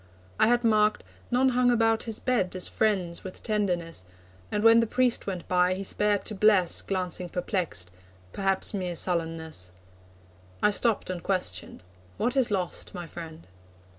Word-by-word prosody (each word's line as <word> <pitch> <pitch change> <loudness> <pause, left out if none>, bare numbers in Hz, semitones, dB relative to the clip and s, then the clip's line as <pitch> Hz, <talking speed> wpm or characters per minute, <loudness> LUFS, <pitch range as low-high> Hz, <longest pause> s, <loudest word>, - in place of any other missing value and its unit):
I - - +5
had 240 +1 +3
marked, 215 -2 +3 0.3
none 255 +2 +3
hung 250 0 +3
About 225 -2 +3
his 220 - -1
bed, 215 -8 0
as 185 - 0
friends, 190 -6 0
with 185 - -9
tenderness, 180 - -1 0.5
And, 210 - -1
when 230 0 +7
the 230 - +2
priest 250 -1 +1
went 185 -3 -4
by, 180 0 +2
he 195 - -5
spared 205 +1 0
to - - -4
bless, 200 -3 +3
Glancing 180 -2 -3
perplexed 175 - -3 0.4
perhaps 195 0 0
mere 180 -3 -3
sullenness. 165 - -2 0.9
I 210 - +5
stopped 215 -2 +2
and 180 -2 -5
questioned: 185 - -3 0.3
'What 245 +3 0
is 265 -3 +3
lost, 190 -1 -3
my 175 -1 -5
friend?' 165 -1 -10
195 Hz, 155 wpm, -27 LUFS, 175-220 Hz, 0.9 s, when